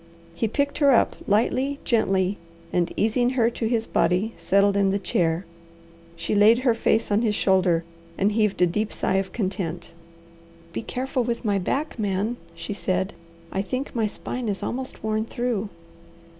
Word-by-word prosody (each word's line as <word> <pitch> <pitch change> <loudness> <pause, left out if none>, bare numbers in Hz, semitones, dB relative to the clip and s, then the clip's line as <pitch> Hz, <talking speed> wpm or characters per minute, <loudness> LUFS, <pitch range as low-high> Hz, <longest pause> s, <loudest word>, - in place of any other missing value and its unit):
He 170 +7 -1
picked 285 +6 -1
her 285 -2 +5
up 250 - +4
lightly, 255 +7 +1
gently, 195 -4 +1 0.3
and 175 -1 +1
easing 240 +3 +2
her 240 -2 +2
to 230 -1 -2
his 230 -1 0
body 195 +6 +1
settled 200 +1 +3
in 200 -1 +3
the 195 - +1
chair. 170 -2 0 0.7
She - - -3
laid 210 +3 +6
her 250 -1 +3
face 225 -1 +1
on 205 +2 +3
his 215 -3 +1
shoulder, 185 -4 +3 0.3
and 200 +2 +2
heaved 210 -4 +2
a - - +7
deep 210 +5 -1
sigh 190 - 0
of 195 0 -1
content. 185 -6 -3 0.8
"Be - - -2
careful 255 +2 -2
with 235 0 -3
my 200 -2 +2
back, 275 - -2
Man," 205 +3 -1 0.2
she 205 - -5
said. 190 -1 -1 0.4
"I 190 - 0
think 255 +7 -4
my 225 -3 +1
spine 240 +2 -4
is 200 - -3
almost 260 -2 -4
worn 215 0 0
through." 230 -3 -2
215 Hz, 170 wpm, -24 LUFS, 195-240 Hz, 0.8 s, a